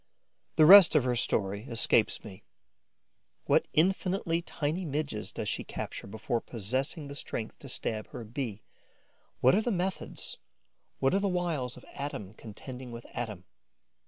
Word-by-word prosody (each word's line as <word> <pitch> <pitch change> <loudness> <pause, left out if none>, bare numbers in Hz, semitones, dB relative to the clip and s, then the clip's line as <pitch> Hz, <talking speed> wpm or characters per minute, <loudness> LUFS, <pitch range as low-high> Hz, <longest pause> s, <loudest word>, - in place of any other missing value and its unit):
The 155 - +7
rest 190 -1 +10
of 150 - +5
her 125 -1 +1
story 100 -1 +1
escapes 115 -2 +2
me. 95 -3 -11 1.0
What - - +3
infinitely 180 0 +1
tiny 160 +2 -2
Midges 145 - -3
does - - -4
she - - -1
capture - - -6
before 110 +3 -2
possessing 130 - -3
the 140 - -7
strength 115 -5 -4
to 140 - -10
stab 110 -3 -2
her 120 - -8
Bee? 115 -2 -5 0.8
What 130 - +6
are 210 - +4
the 240 - -1
methods, 185 -1 -3 0.6
what 135 - +2
the 200 +1 +2
wiles 165 -9 -1
of 125 - -13
atom 110 -9 -5
contending 125 +4 -9
with 115 0 -8
atom? 110 -6 -4
130 Hz, 145 wpm, -30 LUFS, 110-165 Hz, 1.0 s, rest